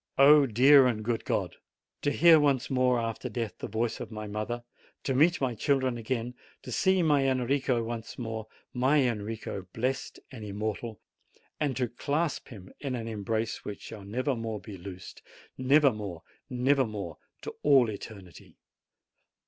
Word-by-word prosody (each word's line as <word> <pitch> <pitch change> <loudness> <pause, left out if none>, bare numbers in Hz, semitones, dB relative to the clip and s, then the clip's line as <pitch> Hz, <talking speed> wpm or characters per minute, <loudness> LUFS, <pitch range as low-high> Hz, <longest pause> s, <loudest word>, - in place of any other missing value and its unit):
O 145 +1 +7
great 125 +5 +5 0.2
and 110 -3 -3
good 115 -1 -1
God! - - -1 0.4
To - - +1
hear 165 +2 +6
once 140 -3 +1
more 125 -1 +3
after 115 +2 -3
death 115 -1 -4
the - - -4
voice 115 +2 -2
of - - -6
my 110 -1 -6
mother, 105 +3 -4 0.4
to 135 - 0
meet 160 +6 +4
my 130 -3 0
children 130 +1 +1
again, 120 +1 -3 0.3
to 125 - -8
see 185 - +3
my 145 -4 +3
Enrico 130 -1 +1
once 115 0 -6
more, 110 -2 -5 0.3
my 130 +2 +3
Enrico, 105 -4 -4
blessed 130 +3 -2
and 120 -5 -9
im 100 -2 -6
mortal, 110 +1 -3 0.6
and 140 -5 0
to 125 -2 +1
clasp 145 +6 -2
him 95 -6 -12
in 135 -3 -3
an 115 -2 -5
embrace 110 +1 -2
which 105 - -7
shall 105 -3 -9
never 125 +7 -1
more 115 -2 -4
be 105 -1 -9
loosed, 95 0 -10 0.3
nevermore, 130 - +2 0.3
nevermore 125 - 0 0.2
to - - -6
all 135 -5 +5
eternity! 100 -4 -9
120 Hz, 155 wpm, -29 LUFS, 110-135 Hz, 0.6 s, O